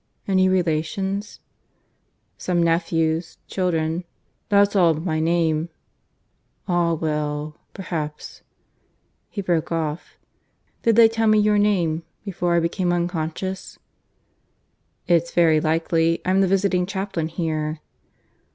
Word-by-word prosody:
"Any 185 Hz, -1 st, +3 dB
relations?" 190 Hz, +4 st, -1 dB, 0.9 s
"Some 175 Hz, -2 st, 0 dB
nephews 165 Hz, 0 st, 0 dB
children. 170 Hz, -2 st, -1 dB, 0.5 s
That's 205 Hz, 0 st, +4 dB
all 180 Hz, -4 st, +5 dB
of 160 Hz, +1 st, -1 dB
my 155 Hz, -3 st, 0 dB
name." 165 Hz, 0 st, +1 dB, 1.0 s
"Ah 175 Hz, -2 st, +2 dB
well! 150 Hz, -1 st, -3 dB, 0.2 s
Perhaps 155 Hz, -6 st, -5 dB, 0.5 s
" -, -, -46 dB
(He 200 Hz, -, -5 dB
broke 170 Hz, -4 st, 0 dB
off). 160 Hz, -1 st, -3 dB, 0.6 s
"Did 230 Hz, -1 st, +3 dB
they 230 Hz, 0 st, +8 dB
tell 225 Hz, 0 st, 0 dB
me 215 Hz, 0 st, +5 dB
your 210 Hz, 0 st, +3 dB
name, 175 Hz, -6 st, +1 dB, 0.2 s
before 175 Hz, -3 st, -1 dB
I -, -, +4 dB
became 175 Hz, +2 st, 0 dB
unconscious?" 175 Hz, +2 st, -3 dB, 1.3 s
"It's 170 Hz, -1 st, +2 dB
very 165 Hz, -3 st, +4 dB
likely. 165 Hz, +1 st, +1 dB
I'm 190 Hz, +1 st, +3 dB
the 195 Hz, -, +3 dB
visiting 185 Hz, -1 st, +1 dB
chaplain 190 Hz, -5 st, -3 dB
here." 155 Hz, -2 st, -3 dB
170 Hz, 115 wpm, -22 LUFS, 160-190 Hz, 1.3 s, they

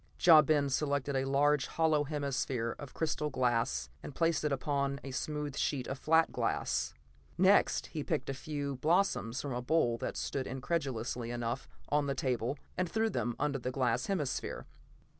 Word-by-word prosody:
Ja 165 Hz, -4 st, +8 dB
Ben 145 Hz, -1 st, +2 dB
selected 140 Hz, 0 st, 0 dB
a 135 Hz, 0 st, +1 dB
large 140 Hz, +1 st, +3 dB
hollow 160 Hz, -2 st, +2 dB
hemisphere 135 Hz, -5 st, -2 dB
of 145 Hz, -3 st, -8 dB
crystal 155 Hz, -1 st, -1 dB
glass 115 Hz, -, 0 dB
and 145 Hz, -, -8 dB
placed 165 Hz, -3 st, +1 dB
it 150 Hz, -, +1 dB
upon 140 Hz, 0 st, -1 dB
a 135 Hz, -, -6 dB
smooth 150 Hz, +1 st, -3 dB
sheet 135 Hz, -3 st, -1 dB
of 135 Hz, -, -5 dB
flat 160 Hz, +1 st, +3 dB
glass. -, -, -1 dB, 0.4 s
Next -, -, +4 dB
he -, -, -5 dB
picked -, -, -1 dB
a 135 Hz, -, -2 dB
few 140 Hz, -1 st, -4 dB
blossoms 155 Hz, -6 st, +1 dB
from 140 Hz, -3 st, -3 dB
a 125 Hz, -, -2 dB
bowl 125 Hz, -4 st, +2 dB
that -, -, -3 dB
stood, 135 Hz, -2 st, -2 dB
incongruously 130 Hz, -4 st, -2 dB
enough, 120 Hz, +1 st, -3 dB, 0.2 s
on 145 Hz, -1 st, +2 dB
the 140 Hz, -, -1 dB
table, 130 Hz, 0 st, -1 dB, 0.2 s
and 180 Hz, -1 st, -1 dB
threw 220 Hz, +2 st, +1 dB
them 120 Hz, -1 st, -1 dB
under 140 Hz, -2 st, 0 dB
the 125 Hz, -, -3 dB
glass 125 Hz, -2 st, 0 dB
hemisphere. 155 Hz, -10 st, -2 dB
140 Hz, 170 wpm, -32 LUFS, 125-150 Hz, 0.4 s, Ja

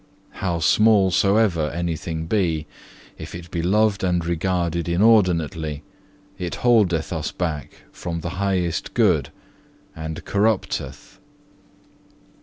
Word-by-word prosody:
How 90 Hz, -3 st, 0 dB
small 100 Hz, +3 st, +4 dB
soever 95 Hz, -5 st, +2 dB
anything 80 Hz, -1 st, -3 dB
be, 80 Hz, -5 st, 0 dB, 0.5 s
if -, -, -8 dB
it 85 Hz, 0 st, -10 dB
be 85 Hz, -, -2 dB
loved 105 Hz, +3 st, +2 dB
and 90 Hz, -2 st, +1 dB
regarded 85 Hz, 0 st, -1 dB
inordinately, 85 Hz, -6 st, +2 dB, 0.6 s
it 90 Hz, -2 st, -3 dB
holdeth 95 Hz, -9 st, +3 dB
us 80 Hz, -2 st, -3 dB
back 75 Hz, -6 st, -5 dB
from 85 Hz, -1 st, -5 dB
the 85 Hz, -, -4 dB
highest 90 Hz, -4 st, -1 dB
good, -, -, +3 dB, 0.7 s
and 80 Hz, 0 st, -6 dB
corrupteth." 105 Hz, 0 st, -1 dB
85 Hz, 105 wpm, -22 LUFS, 80-100 Hz, 0.7 s, small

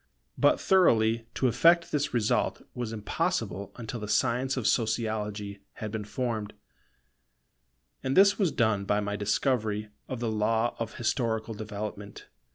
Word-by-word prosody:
But -, -, +3 dB
thoroughly 115 Hz, -11 st, +3 dB
to 130 Hz, -, +2 dB
effect 170 Hz, +7 st, +4 dB
this 145 Hz, -1 st, 0 dB
result 115 Hz, -3 st, 0 dB
was 120 Hz, -3 st, -4 dB
impossible 100 Hz, -3 st, -2 dB
until 120 Hz, 0 st, -6 dB
the 105 Hz, -, -5 dB
science 130 Hz, +4 st, +1 dB
of 125 Hz, -, -2 dB
Sociology 105 Hz, -3 st, -1 dB
had 110 Hz, -1 st, -6 dB
been 110 Hz, -1 st, -4 dB
formed; 110 Hz, -1 st, -3 dB, 1.5 s
and 135 Hz, +4 st, -1 dB
this 200 Hz, +2 st, +6 dB
was 185 Hz, -6 st, +2 dB
done 110 Hz, -4 st, +1 dB
by 105 Hz, +1 st, +1 dB
my 100 Hz, 0 st, -2 dB
discovery 105 Hz, 0 st, 0 dB, 0.2 s
of 130 Hz, -, -4 dB
the 115 Hz, -2 st, -1 dB
law 110 Hz, +2 st, +1 dB
of 115 Hz, -1 st, -4 dB
historical 115 Hz, -2 st, -1 dB
development. 105 Hz, -1 st, -6 dB
110 Hz, 140 wpm, -28 LUFS, 105-125 Hz, 1.5 s, this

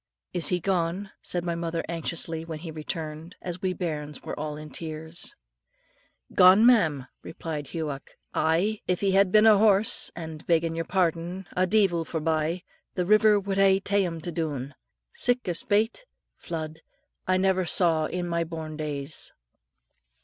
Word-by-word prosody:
"Is 175 Hz, -4 st, +4 dB
he 180 Hz, -, +2 dB
gone?" 185 Hz, +2 st, -1 dB
said 175 Hz, -1 st, -2 dB
my 170 Hz, -, 0 dB
mother 165 Hz, 0 st, -2 dB
anxiously, 165 Hz, -1 st, -3 dB
when 165 Hz, -1 st, -6 dB
he 165 Hz, +1 st, -7 dB
returned. 155 Hz, +1 st, -6 dB
And 175 Hz, -2 st, -4 dB
we 190 Hz, -2 st, 0 dB
bairns 150 Hz, -4 st, -4 dB
were -, -, -5 dB
all 150 Hz, 0 st, -4 dB
in 155 Hz, 0 st, -9 dB
tears. 160 Hz, +1 st, -5 dB, 1.0 s
"Gone, 185 Hz, +5 st, +7 dB
ma'am?" 160 Hz, -, +4 dB, 0.2 s
replied 155 Hz, -3 st, -6 dB
Hughoc; 150 Hz, -3 st, -5 dB, 0.2 s
"aye, 175 Hz, +7 st, +1 dB
if 180 Hz, -1 st, 0 dB
he 195 Hz, -1 st, +2 dB
had 195 Hz, -1 st, +4 dB
been 215 Hz, +1 st, +6 dB
a 215 Hz, -2 st, +7 dB
horse, 210 Hz, -1 st, +3 dB
and, 160 Hz, -2 st, -7 dB
beggin' 165 Hz, -1 st, +2 dB
your 165 Hz, 0 st, -3 dB
pardon, 180 Hz, +1 st, -1 dB
a 185 Hz, 0 st, +2 dB
deevil 190 Hz, -4 st, +3 dB
forbye, 160 Hz, +2 st, -1 dB, 0.3 s
the 180 Hz, -, 0 dB
river 215 Hz, +1 st, +5 dB
would 195 Hz, 0 st, -3 dB
hae 195 Hz, -1 st, +5 dB
ta'en 200 Hz, +1 st, +1 dB, 0.2 s
him 175 Hz, -, -4 dB
doon, 145 Hz, -5 st, -3 dB, 0.4 s
sic 245 Hz, -2 st, +1 dB
a 175 Hz, -, +1 dB
spate 215 Hz, -, 0 dB, 0.3 s
(flood) 160 Hz, -1 st, -6 dB, 0.5 s
I 185 Hz, 0 st, +3 dB
never 190 Hz, -1 st, +2 dB
saw 165 Hz, -2 st, +3 dB
in 180 Hz, -1 st, -3 dB
my 170 Hz, -1 st, 0 dB
born 160 Hz, -2 st, -6 dB
days." 150 Hz, -1 st, -4 dB
170 Hz, 155 wpm, -27 LUFS, 160-190 Hz, 1.0 s, Gone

